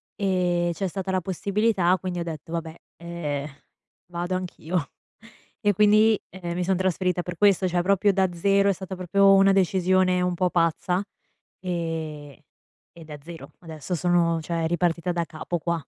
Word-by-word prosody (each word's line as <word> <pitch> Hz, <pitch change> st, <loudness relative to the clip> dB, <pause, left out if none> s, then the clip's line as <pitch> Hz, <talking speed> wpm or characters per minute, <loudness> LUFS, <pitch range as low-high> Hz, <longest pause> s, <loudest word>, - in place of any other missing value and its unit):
E 180 Hz, -3 st, 0 dB
c'è 195 Hz, +2 st, -2 dB
stata 190 Hz, +1 st, -4 dB
la 185 Hz, -, +1 dB
possibilità, 190 Hz, 0 st, +1 dB
quindi 180 Hz, -2 st, -4 dB
ho 170 Hz, -, -2 dB
detto: 160 Hz, -1 st, -7 dB
"Vabbè, 165 Hz, -1 st, -4 dB, 0.2 s
eh, 155 Hz, -4 st, -4 dB, 0.6 s
vado 175 Hz, +1 st, -4 dB
anch'io." 180 Hz, -3 st, -3 dB, 0.7 s
E 205 Hz, -1 st, +3 dB
quindi, 210 Hz, +2 st, +5 dB
ehm, 175 Hz, -2 st, -6 dB
mi 180 Hz, -, -1 dB
sono 185 Hz, 0 st, +1 dB
trasferita 185 Hz, -1 st, 0 dB
per 180 Hz, -, -6 dB
questo, 200 Hz, -2 st, +3 dB
cioè 175 Hz, 0 st, 0 dB
proprio 200 Hz, +1 st, +3 dB
da 190 Hz, -1 st, +2 dB
zero, 200 Hz, +3 st, +2 dB
è 195 Hz, -, +3 dB
stata 190 Hz, +1 st, -7 dB
proprio 195 Hz, +2 st, +4 dB
una 195 Hz, 0 st, +5 dB
decisione 185 Hz, -1 st, +2 dB
un 180 Hz, 0 st, 0 dB
po' 180 Hz, +1 st, +1 dB
pazza, 175 Hz, +3 st, 0 dB, 0.6 s
ehm, 160 Hz, -5 st, -4 dB, 0.6 s
e 170 Hz, -, -12 dB
da 150 Hz, -1 st, -9 dB
zero. 170 Hz, 0 st, -10 dB
Adesso 165 Hz, +1 st, -6 dB
sono 170 Hz, -1 st, +1 dB
cioè 165 Hz, 0 st, -2 dB
ripartita 175 Hz, 0 st, 0 dB
da 170 Hz, -1 st, 0 dB
capo 165 Hz, +2 st, -4 dB
qua. 170 Hz, -1 st, -2 dB
180 Hz, 160 wpm, -25 LUFS, 170-190 Hz, 0.7 s, quindi